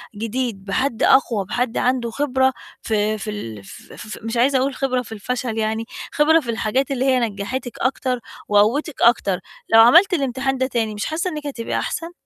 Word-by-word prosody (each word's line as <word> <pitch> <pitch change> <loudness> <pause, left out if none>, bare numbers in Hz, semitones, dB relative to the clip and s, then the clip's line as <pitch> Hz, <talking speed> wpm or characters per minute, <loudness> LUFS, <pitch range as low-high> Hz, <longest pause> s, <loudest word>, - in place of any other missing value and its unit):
جديد، 225 -2 -3
بحد 235 +3 -1
أقوى، 230 -7 +3
بحد 245 -1 -1
عنده 245 -2 0
خبرة 265 -1 +1 0.3
ف 220 - -4
في 215 0 0
ال 115 - -6
ف - - -13
ف 215 - -8
مش 225 +1 -3
عايزة 265 +3 +3
أقول 270 0 -1
خبرة 255 -2 0
في 225 - -13
الفشل 230 +2 -3
يعني، 220 +1 -1 0.3
خبرة 315 +2 +4
في 240 - -8
الحاجات 245 +5 -1
اللي 265 0 0
هي 260 -1 +3
نجّحتِك 230 +3 -4
أكتر 255 -1 -1 0.3
وقوتِك 230 +9 +2
أكتر، 200 -6 +3 0.3
لو 225 - +9
عملتِ 345 - +6
الإمتحان 270 -2 -1
ده 260 0 0
تاني 225 -4 -1
مش 205 - -3
حاسّة 335 +4 -2
إنِّك 300 -3 -6
هتبقى 230 -5 -3
أحسن؟ 335 +1 -4
245 Hz, 180 wpm, -21 LUFS, 220-270 Hz, 0.3 s, لو